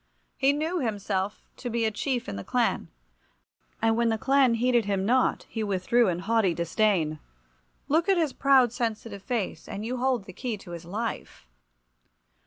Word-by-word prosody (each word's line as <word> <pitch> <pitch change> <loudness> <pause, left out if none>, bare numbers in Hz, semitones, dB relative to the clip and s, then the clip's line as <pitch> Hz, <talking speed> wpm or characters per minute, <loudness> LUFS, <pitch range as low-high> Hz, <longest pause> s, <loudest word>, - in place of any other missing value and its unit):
He 270 0 +3
knew 315 +5 -1
himself 205 -4 -2
to 245 - -5
be 230 -1 0
a 220 - +1
chief 245 +3 -2
in - - -4
the 100 - -5
clan, - - 0 1.0
and 225 0 +4
when 235 0 +2
the 220 - +1
clan 265 0 +3
heeded 240 -1 +2
him 195 -1 0
not 255 +4 +2
he 225 - -3
withdrew 205 +4 +2
in 175 -2 0
haughty 195 -2 +1
disdain. 170 -4 +1 0.7
Look 325 +6 +2
at 385 - +4
his 315 -5 +1
proud, 265 -4 +4
sensitive 225 -4 -3
face 225 -2 -3
and 205 +2 -5
you 250 +2 -2
hold 250 -3 +1
the 190 - -11
key 235 +2 -4
to 185 -3 -12
his 170 0 -7
life. 215 - -5
225 Hz, 175 wpm, -27 LUFS, 195-255 Hz, 1.0 s, and